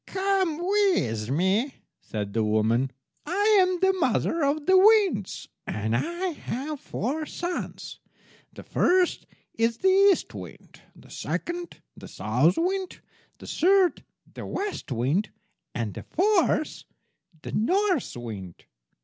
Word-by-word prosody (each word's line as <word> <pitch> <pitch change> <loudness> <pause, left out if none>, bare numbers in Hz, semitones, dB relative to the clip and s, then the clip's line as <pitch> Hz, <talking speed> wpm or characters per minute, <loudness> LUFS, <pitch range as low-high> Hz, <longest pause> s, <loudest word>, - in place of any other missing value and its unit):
"Come 380 -4 0
with 350 - +1
me," 190 - +1 0.2
said 105 -2 -5
the 115 - +1
woman. 110 +4 +1 0.4
"I 410 +4 +3
am 365 -1 +1
the 380 0 +4
mother 335 -1 +1
of 290 +1 0
the 375 - +5
winds, 385 - +4 0.2
and 110 +2 -1
I 345 - -1
have 295 -2 -5
four 300 +8 -3
sons. 350 0 -5 0.5
The - - -11
first 365 0 +1 0.3
is 230 0 +2
the 380 - +2 0.2
East 385 - 0
wind, - - -11
the - - -17
second 345 0 -5
the - - -11
South 130 - +1
wind, 375 +2 -1 0.4
the - - -12
third 375 +1 +2 0.3
the - - -8
West 405 - -4
wind, 140 - 0 0.5
and 110 -4 -3
the - - -7
fourth 365 -4 +1 0.6
the - - -6
North 365 - +1
wind. 100 -7 -8
310 Hz, 125 wpm, -26 LUFS, -, 0.6 s, the